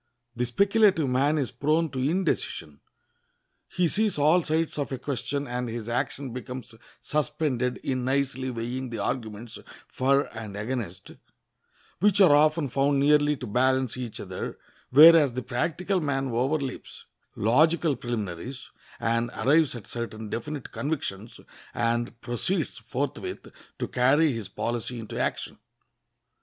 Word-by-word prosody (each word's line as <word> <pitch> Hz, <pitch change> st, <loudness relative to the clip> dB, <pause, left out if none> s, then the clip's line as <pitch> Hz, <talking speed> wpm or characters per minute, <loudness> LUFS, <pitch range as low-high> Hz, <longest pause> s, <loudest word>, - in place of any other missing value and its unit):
The 120 Hz, +1 st, -1 dB
speculative 195 Hz, -, +3 dB
man 140 Hz, +4 st, +2 dB
is 135 Hz, -5 st, -1 dB
prone 155 Hz, +5 st, +1 dB
to 130 Hz, -, -4 dB
indecision; 140 Hz, -, -1 dB, 0.9 s
he 180 Hz, -1 st, +1 dB
sees 210 Hz, +2 st, +1 dB
all 155 Hz, +5 st, +4 dB
sides 160 Hz, -1 st, -1 dB
of 140 Hz, -, -2 dB
a 130 Hz, -, -2 dB
question, 140 Hz, +2 st, -3 dB
and 125 Hz, -1 st, -3 dB
his 115 Hz, -1 st, -5 dB
action 130 Hz, +1 st, -2 dB
becomes 125 Hz, -1 st, -7 dB, 0.3 s
suspended 130 Hz, -4 st, -1 dB
in 130 Hz, -1 st, -1 dB
nicely 130 Hz, 0 st, 0 dB
weighing 125 Hz, +2 st, -4 dB
the 115 Hz, -, -5 dB
arguments 110 Hz, +1 st, -4 dB, 0.3 s
for 140 Hz, +2 st, +2 dB
and 105 Hz, -3 st, -7 dB
against, 105 Hz, -5 st, -5 dB, 0.9 s
which 205 Hz, +2 st, +4 dB
are 175 Hz, -7 st, +7 dB
often 155 Hz, 0 st, +3 dB
found 140 Hz, +2 st, +1 dB
nearly 145 Hz, +1 st, +4 dB
to 125 Hz, -, -6 dB
balance 130 Hz, +2 st, +1 dB
each 125 Hz, -3 st, -6 dB
other; -, -, -6 dB, 0.3 s
whereas 150 Hz, -2 st, +8 dB
the 130 Hz, -, -3 dB
practical 170 Hz, +10 st, -1 dB
man 135 Hz, -3 st, -1 dB
overleaps 130 Hz, +3 st, -2 dB, 0.3 s
logical 155 Hz, +7 st, +3 dB
preliminaries 120 Hz, +1 st, -5 dB, 0.3 s
and 115 Hz, +1 st, 0 dB
arrives 150 Hz, 0 st, +3 dB
at 115 Hz, -, -8 dB
certain 110 Hz, -2 st, -6 dB
definite 145 Hz, +5 st, -5 dB
convictions, 115 Hz, -8 st, -4 dB, 0.4 s
and 120 Hz, 0 st, -1 dB
proceeds 130 Hz, -, -2 dB
forthwith 130 Hz, +4 st, -4 dB, 0.3 s
to -, -, -3 dB
carry 140 Hz, +5 st, +3 dB
his 115 Hz, -6 st, -5 dB
policy 120 Hz, +2 st, -3 dB
into 110 Hz, -, -6 dB
action. -, -, -2 dB
130 Hz, 130 wpm, -26 LUFS, 120-150 Hz, 0.9 s, whereas